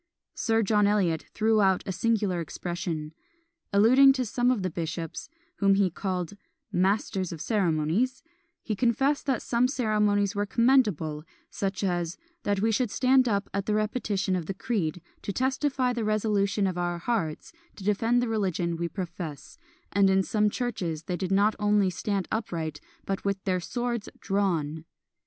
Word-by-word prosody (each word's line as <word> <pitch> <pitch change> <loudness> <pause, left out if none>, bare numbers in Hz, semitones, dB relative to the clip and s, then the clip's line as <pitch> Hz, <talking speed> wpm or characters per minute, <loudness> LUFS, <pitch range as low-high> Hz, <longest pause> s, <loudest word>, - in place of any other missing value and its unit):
Sir 225 -1 +1
John 210 0 +3
Eliot 185 -6 +1
threw 220 0 +3
out 190 -2 +3
a 195 - -2
singular 205 -4 0
expression. 165 -1 -4 0.6
Alluding 255 +7 +7
to 260 -2 -1
some 245 +2 +1
of 240 -7 +1
the 185 - -1
bishops, 165 0 -5 0.3
whom 195 -1 +4
he 195 -2 +2
called 185 -1 -3 0.4
"masters 190 0 0
of 165 - -6
ceremonies," 195 - 0 0.4
he 215 - -2
confessed 270 +6 +1
that 265 -4 0
some 240 +1 +2
ceremonies 210 -6 +1
were 205 0 -1
commendable, 210 - +2 0.3
such 195 0 -2
as 175 -2 -1 0.2
"that 200 -1 0
we 225 +1 +2
should 240 +1 +1
stand 255 +2 +3
up 200 -1 0
at 195 0 -2
the 210 - +2
repetition 210 -3 0
of 175 -3 -3
the 195 - -3
creed, 180 -7 -2 0.2
to - - -3
testify 260 +1 0
the 235 -2 -2
resolution 210 -1 +1
of 185 -2 -1
our 175 0 -1
hearts 175 - -2 0.2
to 195 - -10
defend 225 +4 +2
the - - -1
religion 185 -6 -1
we 170 0 -2
profess, 175 - -7 0.3
and 200 -1 +4
in 190 0 +3
some 210 +2 +2
churches 185 -10 -3
they 180 - -3
did 185 +1 -3
not 205 +2 +3
only 205 -2 +3
stand 195 0 -2
upright, 165 -8 -3 0.2
but 195 -1 -3
with 200 -1 -1
their 185 -2 0
swords 240 +3 -3
drawn." 165 -6 -1
200 Hz, 160 wpm, -27 LUFS, 180-225 Hz, 0.6 s, Alluding